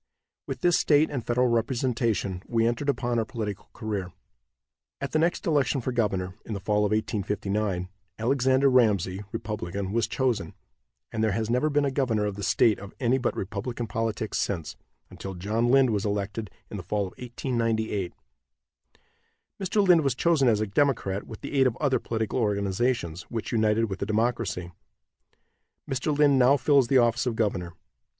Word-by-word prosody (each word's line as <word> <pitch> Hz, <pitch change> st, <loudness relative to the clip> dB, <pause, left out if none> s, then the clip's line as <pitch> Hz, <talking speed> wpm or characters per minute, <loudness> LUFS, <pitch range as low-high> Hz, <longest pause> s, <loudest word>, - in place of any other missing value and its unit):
With -, -, -5 dB
this 175 Hz, -1 st, +4 dB
state 150 Hz, +1 st, +3 dB
and 130 Hz, -5 st, -3 dB
federal 125 Hz, +2 st, +1 dB
representation 115 Hz, -5 st, 0 dB
we 115 Hz, -1 st, +1 dB
entered 120 Hz, +5 st, 0 dB
upon 120 Hz, -3 st, 0 dB
our -, -, +2 dB
political 110 Hz, -5 st, -5 dB
career. 100 Hz, -4 st, -4 dB, 0.9 s
At 140 Hz, -, -4 dB
the 155 Hz, -, +2 dB
next 170 Hz, +2 st, +1 dB
election 145 Hz, -4 st, +2 dB
for 130 Hz, +1 st, -2 dB
governor, 95 Hz, -6 st, -1 dB
in 110 Hz, -, -5 dB
the -, -, -4 dB
fall 105 Hz, +1 st, +1 dB
of -, -, +1 dB
1859, 105 Hz, -3 st, -1 dB, 0.3 s
Alexander 130 Hz, +3 st, +2 dB
Ramsey, 105 Hz, -7 st, +2 dB
Republican, 100 Hz, -4 st, -4 dB
was 115 Hz, 0 st, +1 dB
chosen, 125 Hz, -5 st, -1 dB, 0.6 s
and 110 Hz, -1 st, -1 dB
there 110 Hz, -2 st, +2 dB
has 110 Hz, +2 st, -1 dB
never 125 Hz, +5 st, +2 dB
been 145 Hz, -1 st, +2 dB
a 140 Hz, -, 0 dB
governor 120 Hz, -6 st, 0 dB
of 105 Hz, -1 st, -2 dB
the 100 Hz, -, -7 dB
state 105 Hz, +2 st, +3 dB
of 100 Hz, 0 st, -10 dB
any 130 Hz, +1 st, +2 dB
but 125 Hz, -, -1 dB
Republican 110 Hz, +5 st, -4 dB
politics 110 Hz, -2 st, -2 dB
since, 85 Hz, -6 st, -2 dB, 0.4 s
until 95 Hz, -1 st, -7 dB
John 110 Hz, +6 st, 0 dB
Lind 135 Hz, -1 st, +5 dB
was 100 Hz, -2 st, 0 dB
elected 105 Hz, +1 st, -2 dB, 0.2 s
in 105 Hz, -, -4 dB
the -, -, -5 dB
fall 105 Hz, +4 st, -1 dB
of 95 Hz, -2 st, -4 dB
1898. 115 Hz, -6 st, -1 dB, 1.5 s
Mr. 195 Hz, +1 st, +1 dB
Lind 175 Hz, -3 st, +7 dB
was 135 Hz, -4 st, 0 dB
chosen 155 Hz, -2 st, +3 dB
as 110 Hz, -3 st, +3 dB
a -, -, +1 dB
Democrat, 105 Hz, -4 st, 0 dB
with 110 Hz, -, -9 dB
the -, -, -6 dB
aid 135 Hz, -2 st, +4 dB
of 125 Hz, 0 st, -2 dB
other 135 Hz, -4 st, +1 dB
political 110 Hz, +2 st, -2 dB
organizations, 100 Hz, -3 st, 0 dB
which 115 Hz, -2 st, -4 dB
united 110 Hz, -1 st, +2 dB
with 95 Hz, -, -5 dB
the 100 Hz, -, -2 dB
Democracy. 110 Hz, -5 st, -1 dB, 1.2 s
Mr. 135 Hz, +3 st, -1 dB
Lind 145 Hz, -2 st, +5 dB
now 130 Hz, +3 st, +5 dB
fills 135 Hz, -1 st, +4 dB
the 135 Hz, -, +4 dB
office 120 Hz, +1 st, +3 dB
of 120 Hz, -, -1 dB
governor. 95 Hz, -6 st, -1 dB
115 Hz, 170 wpm, -26 LUFS, 100-130 Hz, 1.5 s, Lind